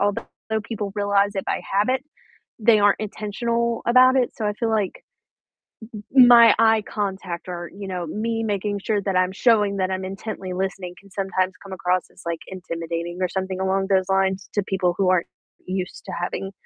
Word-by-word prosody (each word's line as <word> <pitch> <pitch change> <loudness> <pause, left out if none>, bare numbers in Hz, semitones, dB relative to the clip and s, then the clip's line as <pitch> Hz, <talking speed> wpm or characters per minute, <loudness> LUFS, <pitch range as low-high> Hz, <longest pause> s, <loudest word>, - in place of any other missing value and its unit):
although 205 0 0 0.4
people 210 -3 -5
realize 205 -1 +2
it 195 - -2
by - - -1
habit, 215 +7 +2 0.6
they 215 0 +5
aren't 205 -1 +3
intentional 230 +3 -2
about 255 +2 +6
it. 255 -2 +2
So 215 - -2
I 210 - +1
feel 225 +2 -2
like 210 -4 -1 0.9
m 210 - -7 0.2
m 250 - +10
my 235 -2 +8
eye 225 -1 +4
contact 190 -4 -4
or, 175 -1 -5
you 200 -1 -6
know, 180 -2 -4
me 225 +6 -2
making 205 -1 -1
sure 210 -2 0
that 195 -2 -1
I'm 185 0 +2
showing 205 -2 +2
that 185 -1 0
I'm 190 0 -2
intently 190 0 -6
listening 185 -1 -4
can 195 -1 -20
sometimes 190 -1 -1
come 195 -1 -9
across 180 0 0
as, - - -17
like, 170 -1 -2
intimidating 170 -1 -5
or 185 - +1
something 190 0 -3
along 190 0 +1
those 190 -1 +2
lines 190 0 +1
to 205 - +1
people 185 -2 0
who 190 -2 +2
aren't 180 -2 +1 0.4
used 185 -1 -4
to - - -5
having 195 +2 -4
195 Hz, 185 wpm, -23 LUFS, 185-215 Hz, 0.9 s, m